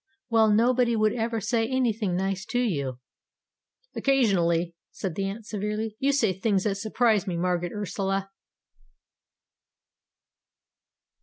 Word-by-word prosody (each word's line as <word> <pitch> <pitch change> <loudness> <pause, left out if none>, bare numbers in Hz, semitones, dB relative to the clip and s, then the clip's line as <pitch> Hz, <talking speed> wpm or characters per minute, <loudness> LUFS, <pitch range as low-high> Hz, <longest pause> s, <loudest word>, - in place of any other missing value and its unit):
"Well, 220 -1 +5
nobody 235 +2 +3
would 215 -1 +2
ever 230 -1 -1
say 225 +2 0
anything 225 -7 0
nice 195 +1 -1
to 245 - -1
you." 140 - -1 1.0
"Occasionally," 180 -11 +2 0.2
said 190 -5 -5
the 195 +4 -2
Aunt 205 +3 -5
severely, 210 +1 -3
"you 275 +1 +2
say 230 -9 +2
things 190 +1 0
that 200 -2 0
surprise 215 -1 +1
me, 175 -2 -2
Margaret 175 0 -1
Ursula." 195 -1 -2
210 Hz, 120 wpm, -26 LUFS, 190-230 Hz, 1.0 s, Well